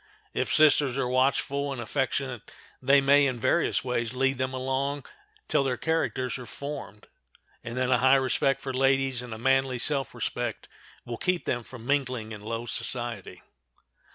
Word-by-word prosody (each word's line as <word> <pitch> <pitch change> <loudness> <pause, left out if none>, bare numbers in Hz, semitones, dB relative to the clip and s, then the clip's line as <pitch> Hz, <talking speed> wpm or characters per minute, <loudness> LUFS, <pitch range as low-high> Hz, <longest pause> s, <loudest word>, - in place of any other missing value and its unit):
If - - -1
sisters 145 -4 +4
are 135 -2 0
watchful 140 +2 +1
and 135 - -5
affectionate 130 0 -2 0.3
they 140 +2 +5
may 140 +1 +5
in 125 -3 -2
various 170 +7 +1
ways 120 -2 -2
lead 135 0 +1
them 130 0 -1
along 135 +2 -2 0.4
till - - +2
their 130 -2 -1
characters 130 -6 -1
are 125 - -9
formed, 140 -4 -7 0.6
and 120 +1 -6
then 130 0 +1
a 125 - +4
high 130 +2 +6
respect 135 +1 +1
for 130 - -4
ladies 135 -1 +2
and 125 -1 -9
a 110 - -5
manly 135 +1 +2
self 135 +1 +1
respect - - -3 0.4
will 120 -1 -5
keep 180 +5 0
them 120 - -1
from 120 -1 -11
mingling 130 -5 -1
in 105 -2 -7
low 115 +2 -4
society. 120 -1 -3
130 Hz, 165 wpm, -27 LUFS, 125-140 Hz, 0.6 s, high